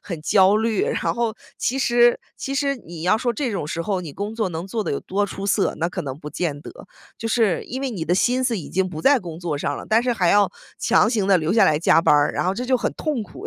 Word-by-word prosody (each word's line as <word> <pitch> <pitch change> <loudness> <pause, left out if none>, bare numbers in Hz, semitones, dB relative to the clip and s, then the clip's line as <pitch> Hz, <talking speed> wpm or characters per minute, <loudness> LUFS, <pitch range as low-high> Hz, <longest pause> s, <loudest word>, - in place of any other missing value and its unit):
很 170 -5 -6
焦 195 +4 +4
虑。 220 -2 0
然 - - -1
后， 235 -2 -1 0.2
其 265 +2 -1
实 240 -2 +4 0.2
其 275 - -4
实 275 -1 0
你 170 -7 -10
要 185 +5 +3
说 240 +1 -1
这 255 +1 -2
种 175 -7 -3
时 165 +2 -4
候 190 +1 -1
你 160 -5 -8
工 205 +5 -5
作 220 -4 -1
能 170 +2 -5
做 220 +2 -2
的 - - -2
有 - - -1
多 200 +2 -1
出 195 0 -6
色， 200 0 +1
那 165 +2 0
可 - - -5
能 135 0 -6
不 150 - -8
见 150 -3 -3
得。 - - -10 0.5
就 225 - -4
是 220 -7 +1
因 260 +3 -5
为 270 -2 -2
你 180 -8 -4
的 175 - +1
心 250 +6 +2
思 235 -5 0
已 160 - -8
经 190 0 0
不 155 -3 -6
在 275 - +5
工 170 -3 -8
作 170 -4 -3
上 145 0 -2
了， - - -8
但 225 +2 +3
是 250 -1 +1
还 185 -6 +1
要 205 -3 +4 0.3
强 215 - +3
行 215 -5 0
地 190 -2 +5
留 160 +3 -1
下 225 - +5
来 150 - +3
加 165 - +4
班 165 - +3
儿， 145 0 +3
然 - - -1
后 185 - +1
这 250 +3 -4
就 255 -1 +3
很 - - -2
痛 295 -8 -2
苦， 205 - -10
200 Hz, 305 characters per minute, -22 LUFS, 170-235 Hz, 0.5 s, 在